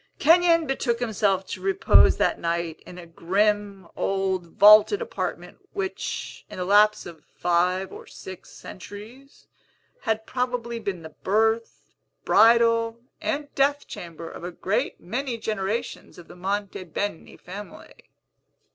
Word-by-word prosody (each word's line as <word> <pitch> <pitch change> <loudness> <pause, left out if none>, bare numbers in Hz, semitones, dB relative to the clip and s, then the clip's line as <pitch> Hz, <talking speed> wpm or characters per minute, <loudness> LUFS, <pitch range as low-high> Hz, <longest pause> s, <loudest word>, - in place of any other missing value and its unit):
Kenyon 335 +1 +5
betook 260 -4 -1
himself 205 -5 0
to - - -7
repose 390 0 +4
that - - +1
night 170 -1 -2
in 180 - -10
a 175 - -9
grim, 195 +3 -1
old, 190 -2 -1
vaulted 210 - +7
apartment, 480 +1 -5
which, 385 -1 -4
in - - -9
the 180 - -3
lapse 210 +2 +4
of 165 -3 -11
five 180 +2 0
or - - -11
six 185 -1 -11
centuries, 220 +9 -12 0.5
had 220 - -2
probably 245 -2 -3
been 190 -6 -4
the 160 - -8
birth, 220 +3 0 0.3
bridal, 230 +1 +4 0.2
and 290 0 -3
death 285 +1 +1
chamber 170 -1 -8
of - - -10
a 175 - -4
great 190 +3 -2
many 240 +6 -3
generations 220 +2 -4
of 175 - -13
the - - -13
Monte 195 +1 -3
Beni 175 +1 -5
family. 200 +3 -11
210 Hz, 130 wpm, -25 LUFS, 185-235 Hz, 0.5 s, vaulted